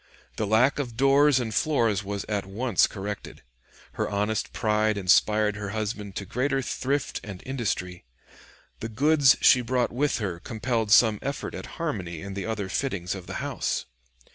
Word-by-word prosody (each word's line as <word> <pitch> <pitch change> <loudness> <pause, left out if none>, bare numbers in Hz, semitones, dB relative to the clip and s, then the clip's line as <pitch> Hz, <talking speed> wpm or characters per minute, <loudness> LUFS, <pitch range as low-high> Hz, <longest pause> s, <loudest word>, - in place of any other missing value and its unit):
The 105 - -1
lack 120 +7 +3
of 120 -5 -4
doors 135 +1 +5
and 115 -3 -3
floors 115 -10 +1
was 100 0 -4
at 100 -3 -2
once 110 +1 +2
corrected. 100 0 -7 0.5
Her - - -2
honest 105 +2 -1
pride 110 -2 +1
inspired 105 +2 +3
her 100 -1 -5
husband 105 -2 -4
to 100 - -4
greater 135 +6 -1
thrift 135 +3 -2
and 100 -4 -8
industry. 105 -9 -3 0.8
The 115 - -5
goods 140 +3 +4
she 125 - +6
brought 125 0 0
with 145 +4 0
her 95 -6 -3
compelled 115 +2 -2
some 110 -2 +6
effort 140 +1 -4
at - - -7
harmony 95 - -3
in 100 0 -6
the 100 +1 -4
other 105 -3 -3
fittings 95 -4 -2
of 95 -3 -8
the - - -6
house. - - -2
110 Hz, 165 wpm, -26 LUFS, 100-130 Hz, 0.8 s, she